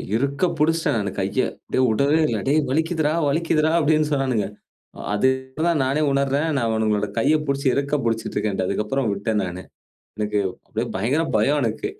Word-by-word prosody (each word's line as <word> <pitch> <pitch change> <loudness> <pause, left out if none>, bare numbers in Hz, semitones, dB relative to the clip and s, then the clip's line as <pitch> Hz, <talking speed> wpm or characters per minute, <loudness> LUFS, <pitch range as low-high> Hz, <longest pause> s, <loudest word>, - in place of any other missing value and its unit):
இருக்க 140 +8 0
புடிச்ட்டேன் 160 -3 +2
நானு 100 -2 -2
கைய, 100 +7 0 0.3
அப்டியே 130 - +2
உடவே 140 +7 +2
இல்ல. 110 -5 -1
"டேய் 150 +3 +3
வலிக்குதுறா, 160 0 +1 0.2
வலிக்குதுறா" 155 0 +1
அப்டின்னு 155 0 +2
சொன்னானுங்க. 130 -6 0 0.7
அது 105 +5 +2 0.2
இப்ப 130 +4 -7
தான் 160 -5 +2
நானே 140 +4 0
உணர்றேன். 140 +3 +1
நான் 115 -3 0
அவனுங்களோட 110 -2 0
கைய 150 +7 +3
புடிச்சு 140 0 0
இறுக்கப் 140 -1 0
புடிச்சிட்டருக்கேன்ட்டு. 105 -4 -1
அதுக்கப்புறம் 110 +4 -1
உட்டடேன் 105 +1 -1
நானு. 90 +1 -6 0.6
எனக்கு 105 0 0 0.3
அப்டியே - - -3
பயங்கர 130 +11 +1
பயம் 145 +8 +2
எனக்கு. 405 - -2
135 Hz, 155 wpm, -22 LUFS, 110-150 Hz, 0.7 s, டேய்